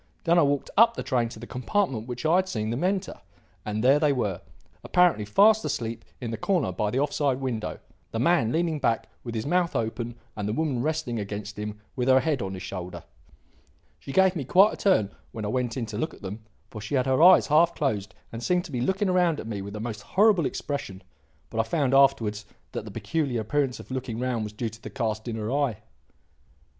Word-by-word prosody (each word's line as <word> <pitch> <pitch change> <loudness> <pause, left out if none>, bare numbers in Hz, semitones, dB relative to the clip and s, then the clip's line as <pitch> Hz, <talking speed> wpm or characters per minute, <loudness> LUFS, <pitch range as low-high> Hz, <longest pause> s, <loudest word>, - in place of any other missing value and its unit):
Then 170 +1 +4
I - - +6
walked 145 -2 0
up 230 +2 +6
the - - -4
train 120 -4 0
to 115 - -10
the 120 - -8
compartment 125 - -1
which 125 +4 -5
I 165 +3 +4
had 190 0 +1
seen 110 -5 -2
them 120 +8 -2
enter. 190 - -1 0.4
And 105 +1 -3
there 135 +3 +5
they 150 -2 +3
were, 105 -9 -1 0.4
apparently 175 - +3
fast 215 - +5
asleep 115 -1 -3 0.2
in 120 -3 -4
the 115 - -3
corner 170 - +1
by 105 +3 -1
the 120 - -2
off 145 +1 +1
side 140 -3 +1
window, 125 -5 -3 0.3
the - - -4
man 130 -2 +3
leaning 165 0 0
back 115 -4 0 0.2
with 115 -2 -6
his 110 - -2
mouth 175 +2 +1
open 115 +1 -2 0.2
and 105 -1 -3
the - - -1
woman 140 -3 0
resting 150 -5 -1
against 105 +1 -6
him 105 0 -5 0.2
with 125 -2 -1
her 130 0 +6
head 140 -1 0
on 95 0 -4
his 95 - -7
shoulder. 90 -1 -6 1.0
She - - -8
gave 190 +3 +4
me 155 - -2
quite 190 - +5
a - - -7
turn 145 - +2 0.2
when 110 -2 -5
I - - -2
went 125 +1 -1
in 120 - -2
to 110 -1 -6
look 155 - -2
at - - -19
them, 100 +3 -6 0.3
for 105 - -7
she 110 +7 -3
had 130 -2 +2
her 130 +2 +2
eyes 180 +2 +8
half 165 +3 +4
closed 105 - -2 0.2
and 115 - -6
seemed 180 +7 +1
to 170 - -9
be 125 -3 -2
looking 190 - +1
round 175 -4 +2
at - - -6
me 105 -3 -4
with 100 +1 -7
a - - -5
most 110 -1 -5
horrible 200 -6 +3
expression; 100 -10 -5 0.5
but 115 - -3
I - - +4
found 135 +2 0
afterwards 115 -6 +3 0.2
that - - -5
the - - -7
peculiar 140 -8 -1
appearance 135 +3 -1
of - - -11
looking 130 -3 -4
round 125 -3 -1
was 105 - -7
due 115 +2 -3
to 110 +1 -14
the - - -7
cast 110 -3 -3
in 115 - -3
her 110 +1 -3
eye." 140 -6 0
125 Hz, 230 wpm, -26 LUFS, 110-160 Hz, 1.0 s, eyes